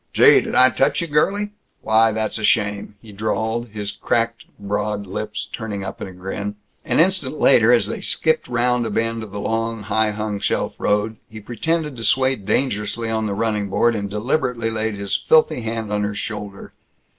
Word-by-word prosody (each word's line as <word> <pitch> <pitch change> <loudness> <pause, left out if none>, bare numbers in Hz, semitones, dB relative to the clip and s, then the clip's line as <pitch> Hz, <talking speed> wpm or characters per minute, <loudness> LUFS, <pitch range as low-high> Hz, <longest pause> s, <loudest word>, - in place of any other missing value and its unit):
"Gee, - - +7
did - - -4
I 130 0 +6
touch 135 - +1
you, - - -1
girlie? 200 +7 +1 0.3
Why, 110 +1 +4
that's 110 +1 -2
a - - -6
shame!" 105 -1 +1
he 110 - -12
drawled, 110 +3 -2
his 105 -2 -4
cracked 115 +3 -1
broad 105 0 -2
lips 105 +3 -5
turning 105 -4 -4
up 95 0 -7
in - - -4
a - - -9
grin. 95 +3 -5 0.3
An - - 0
instant 165 -5 +1
later, 120 -3 +5
as 120 -5 +4
they 105 - -5
skipped 160 - +1
round 120 0 +1
a - - -3
bend 115 +2 -1
of 110 - -7
the 100 - -5
long, 115 +1 -2
high 110 +2 +1
hung 105 -1 -3
shelf - - -1
road, 105 +2 0
he 110 - -9
pretended 150 +7 -2
to 115 - -6
sway 130 +2 +3
dangerously 110 +1 -1
on 110 -1 0
the 100 - -2
running 105 -2 -1
board, 115 +4 +2
and 100 -1 -3
deliberately 115 +2 -1
laid 110 -1 -2
his 100 -1 -2
filthy 155 -5 +3
hand 110 -2 -3
on 105 - 0
her 105 0 -2
shoulder. 105 -2 -6
110 Hz, 190 wpm, -21 LUFS, 105-120 Hz, 0.3 s, Gee